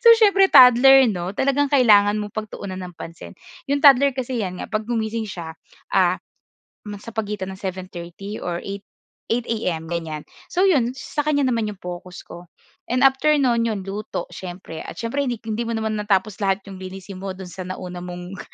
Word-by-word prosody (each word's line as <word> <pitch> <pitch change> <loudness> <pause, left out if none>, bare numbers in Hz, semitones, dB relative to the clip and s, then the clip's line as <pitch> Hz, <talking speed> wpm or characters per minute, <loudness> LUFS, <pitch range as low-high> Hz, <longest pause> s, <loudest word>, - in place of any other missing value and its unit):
So - - +8
siyempre 395 -3 +5
toddler 260 +1 +8
'no. 180 0 -4
Talagang 275 +1 +2
kailangan 210 -7 +5
mong 205 -1 -7
pagtuunan 200 -3 -6
ng 180 -1 -8
pansin. 165 0 -10 0.3
'Yong 280 0 0
toddler 275 -1 +7
kasi 255 -2 -2
'yan 185 -3 -3
nga - - -5
'pag 215 0 -1
gumising 225 -1 -1
siya, 165 -3 -6 0.4
ah, - - +3 0.7
ma 205 -1 -7
sa 230 +2 -10
pagitan 205 -3 -3
ng 190 - -17
7:30 185 +1 -6
or 175 -1 -3
8, 200 0 -6 0.5
8 240 +1 +1
AM, 180 -8 -2
ganyan. 160 -3 -4 0.3
So 370 +2 +2
'yon, 265 -9 +2
sa 295 - -3
kanya 290 -2 +1
naman 230 -4 0
'yong 205 - -8
focus 180 0 -8
ko. 175 +1 -11 0.4
And 250 +2 +1
after 270 +3 +4
no'n, 240 -5 +2
'yon 210 -4 -3
luto 200 +2 -4
siyempre, 175 -3 -8
at - - -8
siyempre 270 +5 -1
hindi 245 - -1
hindi 225 +1 -2
mo 230 - -2
naman 220 -1 -2
natapos 205 0 0
lahat 195 -1 0
'yong 195 -2 -9
linisin 190 0 -8
mo 190 0 -5
do'n 190 -1 -9
sa 180 +1 -7
nauna 180 -1 -6
mong 180 +1 -8
210 Hz, 190 wpm, -22 LUFS, 185-245 Hz, 0.7 s, So